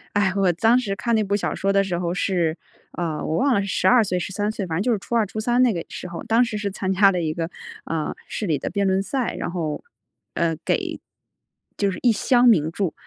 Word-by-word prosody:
唉， 200 -2 +2
我 195 -2 +3
当 225 +8 +4
时 215 -6 -1
看 235 +3 0
那 220 - +2
部 200 0 0
小 - - -2
说 195 0 0
的 195 0 +3
时 185 -3 -2
候 175 0 -2
是 175 -4 0 0.4
呃， 165 -3 -2
我 160 - -1
忘 270 -1 +3
了 200 - +2
是 200 - -4
12 240 +4 +4
岁、 180 -2 -1
13 205 +4 -2
岁？ 210 -3 -4
反 165 -3 -3
正 - - 0
就 250 - +1
是 215 - +1
初 235 - -4
2、 225 -2 +3
初 210 +2 -6
3 240 +3 +2
那 240 - +3
个 170 -3 -4
时 - - -7
候。 170 - -6
当 230 +2 +3
时 225 -3 -3
是 205 -1 -2
参 190 -1 -3
加 195 +1 +5
了 180 -2 -1
一 155 -1 -1
个， 165 +1 -3 0.4
呃， 160 -1 -2
市 215 - -4
里 155 -5 +1
的 - - -3
辩 200 -1 0
论 190 0 +2
赛， 255 +5 -2
然 - - -3
后 165 -4 -3 0.5
呃， 165 -2 0
给 - - -1 0.8
就 200 - +1
是 185 - -6
一 245 - +4
箱 245 +2 +3
名 160 -8 +4
著， 180 -1 -2
195 Hz, 255 characters per minute, -23 LUFS, 175-220 Hz, 0.8 s, 加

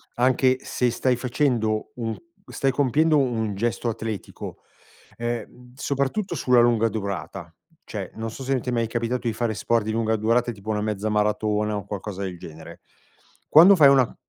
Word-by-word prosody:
anche 130 +1 +3
se 125 -1 0
stai 125 +1 +1
facendo 120 -4 0
un 115 -2 -3 0.3
stai 135 -1 0
compiendo 150 +3 +2
un 115 -6 0
gesto 115 +2 -1
atletico, 110 -3 -6 0.6
ehm, 120 +1 -5
soprattutto 140 +9 -2
sulla 125 -3 +4
lunga 115 -1 +3
durata, 95 -5 -5 0.3
cioè, - - -6
non 110 0 -4
so 135 - -10
se 135 0 0
ti 125 - -5
è - - 0
mai 115 -2 0
capitato 120 +1 -2
di 115 - 0
fare 115 0 -1
sport 115 +1 0
di 110 - -2
lunga 110 0 0
durata 115 +3 +1
tipo 110 0 -6
una 105 -1 -1
mezza 105 0 -2
maratona 105 0 0
o - - -1
un 100 - -10
qualcosa 100 -1 -5
del 90 -3 -5
genere. 80 0 -11 0.7
Quando 175 +6 +8
fai 145 -6 +7
una 130 -4 +3
115 Hz, 170 wpm, -24 LUFS, 105-125 Hz, 0.7 s, Quando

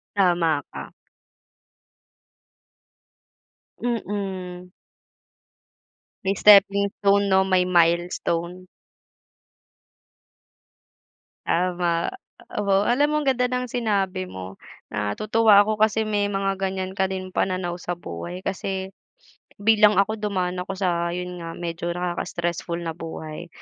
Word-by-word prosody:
Tama 170 -6 +2
ka. - - -7 2.9
Mm. 190 -6 -4 1.5
May 195 +1 +1
stepping 200 0 +6
stone, 200 0 +4
'no, 190 -1 +4
may 185 -1 +2
milestone. 175 0 +1 2.8
Tama, 175 -1 0 0.5
oo. 195 -1 +2
Alam 280 +5 +3
mo - - +1
ang 280 - -4
ganda 250 -1 +2
ng 250 0 -2
sinabi 195 -6 -1
mo. 95 - -9 0.3
Natutuwa 205 - +3
ako 215 +1 0
kasi 215 0 +3
may 210 -2 0
mga 195 -1 -1
ganiyan 190 0 -3
ka 190 - +3
din 185 0 -4
pananaw 185 -2 -1
sa 175 0 -4
buhay 175 - -7
kasi 190 0 -3 0.7
bilang 210 0 +4
ako 210 +2 +1
dumaan 185 -3 -1
ako 190 +1 -5
sa, 175 -3 0
'yon 180 0 -5
nga, 165 0 -7
medyo 170 0 -4
nakaka 175 -1 -3
stressful 170 0 -3
na 170 -1 -4
buhay. 160 0 -8
185 Hz, 105 wpm, -24 LUFS, 175-200 Hz, 2.9 s, stepping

